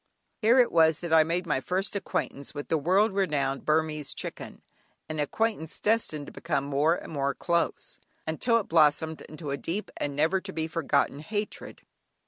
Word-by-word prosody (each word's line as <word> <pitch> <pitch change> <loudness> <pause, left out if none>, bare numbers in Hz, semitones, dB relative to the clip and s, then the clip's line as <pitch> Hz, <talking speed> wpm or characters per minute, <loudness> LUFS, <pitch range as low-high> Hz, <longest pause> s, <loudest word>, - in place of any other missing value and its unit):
Here 235 +3 +4
it 245 -2 +5
was 160 -2 +5
that 170 -2 -2
I 160 -1 +7
made 170 +3 -1
my 150 -5 +1
first 190 +9 -1
acquaintance 140 -7 -3
with 145 - -6
the 160 - +3
world 190 +8 +3
renowned 145 -8 0
Burmese 155 -2 0
chicken, - - -7 0.4
an 155 -1 -4
acquaintance 160 +1 -1
destined 210 -9 0
to - - -10
become 160 -5 -2
more 145 +4 +2
and 165 - -8
more 140 -1 0
close, 170 -1 -1 0.3
until 230 +9 +1
it 220 - -2
blossomed 160 0 +3
into 155 -2 -6
a 140 - -1
deep 185 +9 -4
and 140 -1 -3
never 165 +6 +2
to 190 - -7
be 160 -3 -2
forgotten 145 -4 0
hatred. 205 +7 -5
160 Hz, 175 wpm, -28 LUFS, 150-190 Hz, 0.4 s, I